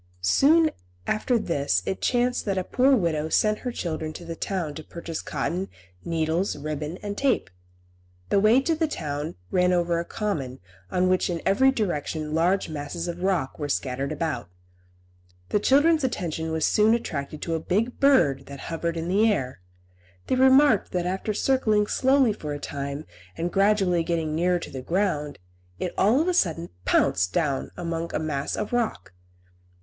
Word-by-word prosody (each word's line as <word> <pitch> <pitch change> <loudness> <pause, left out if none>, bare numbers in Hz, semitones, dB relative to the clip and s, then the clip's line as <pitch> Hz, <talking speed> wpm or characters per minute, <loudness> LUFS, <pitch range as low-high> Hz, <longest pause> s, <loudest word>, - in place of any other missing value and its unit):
Soon 310 - +4 0.3
after 235 +3 +1
this 140 - 0
it 190 - -3
chanced 245 0 +1
that 195 -2 0
the 185 - -1
poor 265 +7 +3
widow 160 -7 0
sent 215 +5 +2
her 250 - -4
children 160 -7 -4
to 170 - -9
the 165 0 -5
town 175 -4 -3
to 155 - -8
purchase 170 0 -6
cotton, 185 +3 -3 0.3
needles, 165 +3 0
ribbon 150 +3 -4
and 205 0 -4
tape. 265 - 0 0.8
The 200 - +3
way 220 +6 +5
to 325 +4 +1
the 320 0 0
town 150 - -4 0.2
ran 180 0 +3
over 175 -1 +1
a - - -2
common 160 - -3 0.3
on 180 0 +1
which 185 0 +2
in 170 -1 -2
every 240 +8 +4
direction 160 - -2
large 175 +5 +2
masses 155 +3 -5
of 175 0 -5
rocks 180 -9 -1
were 145 -1 -3
scattered 135 +1 -2
about. 155 - -3 1.0
The - - +2
children's 290 +7 +4
attention 165 -9 -2
was 160 -1 0
soon 215 +2 +4
attracted 155 -9 -4
to 165 - -2
a 165 - 0
big 215 +9 -1
bird 150 - +3
that 140 -1 -9
hovered 165 +1 -2
in 165 +1 -3
the 210 +5 +3
air. 130 - -3 0.6
They - - -1
remarked 265 -3 +5
that 180 -1 0
after 190 +4 -2
circling 215 -2 +2
slowly 265 0 +3
for 150 -7 -5
a 145 - -5
time, 140 +1 -5 0.3
and 170 +1 -2
gradually 195 -4 +3
getting 165 -2 -1
nearer 175 +3 +2
to 175 - -7
the 130 - -6
ground, 150 -3 -1 0.4
it 180 - -3
all 220 +8 +3
of 325 - +1
a 365 - +2
sudden 170 - 0 0.2
pounced 90 +1 +2
down 145 -5 0
amongst 170 -1 -3
a - - +1
mass 145 -3 -2
of 210 - -4
rock. 225 - -2
175 Hz, 175 wpm, -25 LUFS, 155-215 Hz, 1.0 s, way